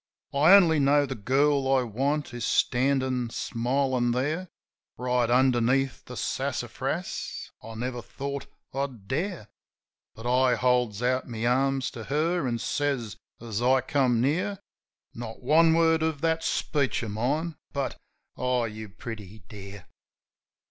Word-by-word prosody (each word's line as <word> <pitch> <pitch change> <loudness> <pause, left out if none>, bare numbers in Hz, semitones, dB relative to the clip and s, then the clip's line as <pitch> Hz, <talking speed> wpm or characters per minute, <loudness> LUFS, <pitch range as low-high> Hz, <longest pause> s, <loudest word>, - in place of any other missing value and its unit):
I 150 +6 +6
only 165 -6 +5
know 145 +1 +4
the 135 - -4
girl 135 +4 +2
I 130 -1 +4
want 135 +5 -1
is 120 -1 -5
standin' 130 -1 +1
smilin' 125 +1 0
there 150 +9 -1 0.5
Right 125 -1 +1
underneath 130 +1 +2
the - - -8
sassafras. - - -3
I 115 +1 -9
never 120 +1 -3
thought 140 +2 -6 0.3
I'd 130 -7 -4
dare, 165 - -3 0.7
But 115 - -10
I 125 +1 +3
holds 125 -3 +1
out 130 +1 0
my 115 -1 -3
arms 135 +1 +1
to 115 -2 -8
her, 155 +2 0
an' 120 -1 -1
says, 125 -2 -2 0.2
as 115 -1 -4
I 130 +2 +4
come 130 -3 +2
near 180 - 0 0.3
— - - -58
Not 115 0 -8
one 160 +4 +5
word 165 -1 +3
of 160 -3 -1
that 165 0 +1
speech 135 -4 0
of 110 - -4
mine 145 +10 -1
— - - -67
but, 140 -2 -3 0.3
"Oh, 125 -1 0
you 110 -1 -6
pretty 105 -1 -9
dear 100 -3 -10
130 Hz, 140 wpm, -27 LUFS, 120-145 Hz, 0.7 s, I